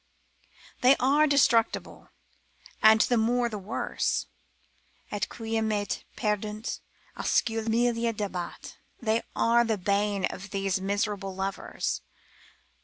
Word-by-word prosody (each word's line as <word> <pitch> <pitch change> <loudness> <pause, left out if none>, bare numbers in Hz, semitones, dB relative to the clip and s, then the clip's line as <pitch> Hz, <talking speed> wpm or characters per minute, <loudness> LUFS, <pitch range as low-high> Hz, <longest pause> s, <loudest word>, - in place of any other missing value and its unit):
They 255 +2 +7
are 285 +4 +4
destructive, 240 -5 +3 0.9
and 220 0 +7
the 245 - +3
more 240 +2 +2
the 210 -2 -5
worse: 195 +2 -1 0.9
Et 205 - -2
quae 225 -1 -2
me 210 -2 0 0.3
perdunt, 210 +1 -2 0.4
oscula 225 -1 0
mille 235 0 +2
dabat, 195 -5 -5 0.2
they 225 0 +1
are 235 +1 +4
the 225 -2 0
bane 200 +1 +1
of 195 +2 -6
these 195 -1 -1
miserable 200 -1 -2
lovers. 195 +1 -3
220 Hz, 105 wpm, -28 LUFS, 200-235 Hz, 0.9 s, They